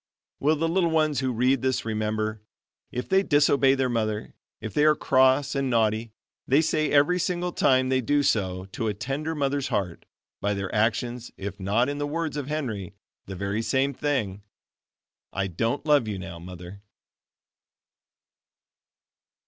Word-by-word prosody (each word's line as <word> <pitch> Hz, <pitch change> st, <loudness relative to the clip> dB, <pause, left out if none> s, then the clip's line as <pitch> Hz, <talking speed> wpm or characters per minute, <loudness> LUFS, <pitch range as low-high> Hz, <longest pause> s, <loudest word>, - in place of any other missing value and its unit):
Will 150 Hz, +3 st, +3 dB
the 165 Hz, +2 st, 0 dB
little 170 Hz, 0 st, +2 dB
ones 155 Hz, -3 st, +2 dB
who 130 Hz, -1 st, 0 dB
read 125 Hz, +2 st, +2 dB
this 130 Hz, -2 st, 0 dB
remember, 110 Hz, -1 st, -2 dB, 0.5 s
if 125 Hz, -, -4 dB
they 190 Hz, 0 st, +4 dB
disobey 145 Hz, -5 st, +4 dB
their 135 Hz, -1 st, +1 dB
mother, 110 Hz, -3 st, -2 dB, 0.3 s
if 110 Hz, -, -6 dB
they 150 Hz, -, +2 dB
are 155 Hz, 0 st, +5 dB
cross 130 Hz, +1 st, +3 dB
and 135 Hz, -2 st, -1 dB
naughty, 110 Hz, -1 st, +1 dB, 0.4 s
they 135 Hz, +3 st, +4 dB
say 155 Hz, -1 st, +1 dB
every 145 Hz, +5 st, +4 dB
single 180 Hz, 0 st, -1 dB
time 130 Hz, -5 st, +3 dB
they 130 Hz, 0 st, +2 dB
do 145 Hz, +4 st, +1 dB
so, 95 Hz, -7 st, 0 dB
to 115 Hz, -, -3 dB
a 105 Hz, -, -1 dB
tender 145 Hz, +8 st, -3 dB
mother's 140 Hz, -1 st, 0 dB
heart, 90 Hz, -5 st, -3 dB, 0.4 s
by 100 Hz, 0 st, 0 dB
their 100 Hz, -1 st, -4 dB
actions 120 Hz, +3 st, 0 dB
if 100 Hz, 0 st, -6 dB
not 105 Hz, +6 st, +1 dB
in 145 Hz, 0 st, -3 dB
the 145 Hz, -, -1 dB
words 160 Hz, 0 st, -3 dB
of 145 Hz, -3 st, -4 dB
Henry, 120 Hz, -, -4 dB, 0.3 s
the 95 Hz, -, -6 dB
very 100 Hz, +3 st, -2 dB
same 135 Hz, +4 st, +1 dB
thing, 120 Hz, -9 st, -2 dB, 0.9 s
"I 100 Hz, +1 st, -1 dB
don't 115 Hz, -, -2 dB
love 145 Hz, -6 st, +4 dB
you 105 Hz, -2 st, -3 dB
now, 90 Hz, -3 st, -8 dB
Mother." 90 Hz, +2 st, -10 dB
130 Hz, 160 wpm, -26 LUFS, 105-145 Hz, 0.9 s, are